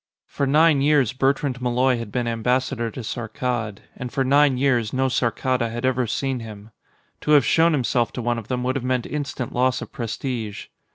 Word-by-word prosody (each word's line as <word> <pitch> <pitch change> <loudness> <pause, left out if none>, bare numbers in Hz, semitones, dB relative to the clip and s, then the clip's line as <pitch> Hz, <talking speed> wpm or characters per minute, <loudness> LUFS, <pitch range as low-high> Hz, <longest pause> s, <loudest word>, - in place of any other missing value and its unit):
For 140 - -2
nine 150 0 +4
years, 140 -5 +3
Bertrand 135 -1 0
Malloy 125 0 +2
had 115 -3 -6
been 125 +2 -1
Ambassador 120 +1 0
to 130 - -7
Saarkkad, 115 -1 -3
and 125 -1 -6
for 135 - 0
nine 140 0 +4
years, 125 -5 +1
no 130 0 +1
Saarkkada 125 -1 0
had 120 +2 -4
ever 130 -1 +1
seen 135 +3 -2
him. 110 -1 -10 0.5
To 150 - +1
have 145 -5 +6
shown 165 +6 +4
himself 125 -3 +1
to 125 - -4
one 120 0 0
of 110 - -11
them 125 -1 -2
would 130 +2 0
have 130 - -5
meant 125 -1 0
instant 140 -4 -4
loss 130 +2 +2
of - - -8
prestige. 115 -3 -4
125 Hz, 190 wpm, -23 LUFS, 120-135 Hz, 0.5 s, have